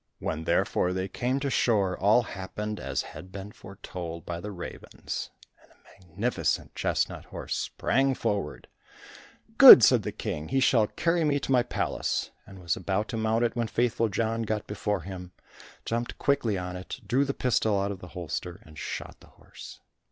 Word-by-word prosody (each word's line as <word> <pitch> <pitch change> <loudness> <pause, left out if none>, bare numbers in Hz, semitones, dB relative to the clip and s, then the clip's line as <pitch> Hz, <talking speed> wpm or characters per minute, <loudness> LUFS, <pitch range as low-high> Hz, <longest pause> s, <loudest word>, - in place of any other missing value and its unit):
When 80 0 -4
therefore 90 +3 +1
they 95 +1 -2
came 125 +7 -1
to 140 -1 -1
shore, 100 -8 +2
all 105 +6 +4
happened 105 +1 -5
as - - -2
had 95 - -11
been 100 +1 -8
foretold 90 -5 -8
by 85 -1 -4
the 105 - -6
ravens, 90 -4 -6 0.3
and - - -25
a 95 - -22
magnificent 100 +9 -1
chestnut - - -1
horse - - -5
sprang 135 0 0
forward. 100 -11 -3 0.9
"Good," - - +12
said - - +6
the - - -4
King, 75 +1 -5
"he 135 - +1
shall 115 -5 +4
carry 165 +6 0
me 145 -2 +2
to - - -3
my 125 -2 +5
palace," 120 - -2 0.2
and 95 - -12
was 85 -3 -1
about 95 +3 -2
to 115 - -3
mount 110 +1 +1
it 115 - -2
when 120 -2 0
Faithful 115 -1 +1
John 115 +3 -1
got 110 -1 -2
before 105 -2 -2
him, 90 -1 -8 0.5
jumped 120 +1 -3
quickly 125 -8 +1
on 90 0 -5
it, 90 +7 -7
drew 125 +7 +2
the 140 0 -2
pistol 110 -5 +1
out 100 +1 -1
of 95 - -7
the 90 - -10
holster, 85 0 -5
and 80 -1 -12
shot - - -6
the - - -18
horse. - - -13
105 Hz, 180 wpm, -27 LUFS, 95-120 Hz, 0.9 s, Good